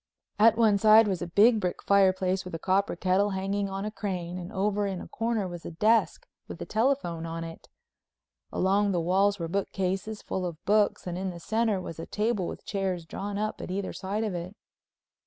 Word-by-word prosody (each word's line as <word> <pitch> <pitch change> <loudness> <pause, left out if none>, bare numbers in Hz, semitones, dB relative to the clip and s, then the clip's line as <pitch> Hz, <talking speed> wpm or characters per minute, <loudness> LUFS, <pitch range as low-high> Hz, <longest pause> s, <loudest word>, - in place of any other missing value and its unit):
At 225 +1 +6
one 215 -3 +4
side 215 +1 +7
was 190 -3 -1
a 175 - -3
big 215 +6 +5
brick 180 -3 -3
fireplace 190 -1 +3
with 180 -2 -7
a - - -2
copper 195 +3 +1
kettle 185 +3 +2
hanging 195 +1 -2
on 195 +1 -4
a 215 - -3
crane 180 -4 -4
and 180 +2 -7
over 205 0 0
in 190 -2 -3
a - - -8
corner 225 -3 -1
was 175 -2 -8
a - - -6
desk 220 - +2 0.2
with - - -8
a - - -5
telephone 215 -9 0
on 165 0 -4
it. 165 0 -10 0.8
Along 200 +1 +2
the 175 - +1
walls 195 +4 +2
were 170 -3 -3
bookcases 195 +3 -2
full 190 - -3
of 175 -3 -4
books 210 0 +2
and 180 0 -4
in 190 0 -2
the 175 -1 -7
center 220 +2 0
was 165 -3 -7
a 165 - -6
table 210 -4 -1
with - - -8
chairs 190 -4 -2
drawn 200 +4 -5
up 215 +1 -3
at - - -6
either 190 +1 -3
side 200 +3 -3
of 210 -3 -2
it. 175 +3 -6
195 Hz, 210 wpm, -28 LUFS, 180-210 Hz, 0.8 s, side